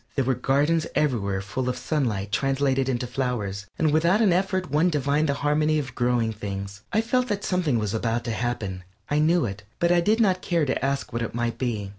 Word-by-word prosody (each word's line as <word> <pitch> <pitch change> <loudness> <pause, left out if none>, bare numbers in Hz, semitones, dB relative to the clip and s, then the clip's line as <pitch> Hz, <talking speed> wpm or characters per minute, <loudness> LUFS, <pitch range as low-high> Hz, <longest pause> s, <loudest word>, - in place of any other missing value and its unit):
There 135 - +1
were 130 - +2
gardens 150 +6 +1
everywhere 100 -9 0
full 125 +6 -2
of 125 - -2
sunlight 110 -10 -1
translated 135 -1 +1
into 125 -1 -1
flowers, 120 -6 -3
and 155 -2 +2
without 170 +6 +3
an 210 -6 +4
effort 185 -3 0
one 155 +5 +3
divined 145 0 +1
the 140 - +1
harmony 155 +1 +2
of 135 -3 -3
growing 120 -2 +1
things. 100 -1 -6
I 220 - +3
felt 250 +2 +1
that 205 -3 -2
something 175 -9 +1
was 105 -2 -2
about 115 +1 -1
to 115 - -3
happen; 110 -6 -3 0.3
I 145 - +3
knew 165 +1 +3
it, 100 -1 -5 0.2
but 170 0 +2
I 175 0 +4
did 215 +6 +2
not 190 -5 +3
care 170 -4 +1
to 130 -1 -1
ask 140 -2 -1
what 115 - -1
it 115 - -4
might 120 -1 -2
be. 110 -6 -2
135 Hz, 215 wpm, -25 LUFS, 115-160 Hz, 0.3 s, an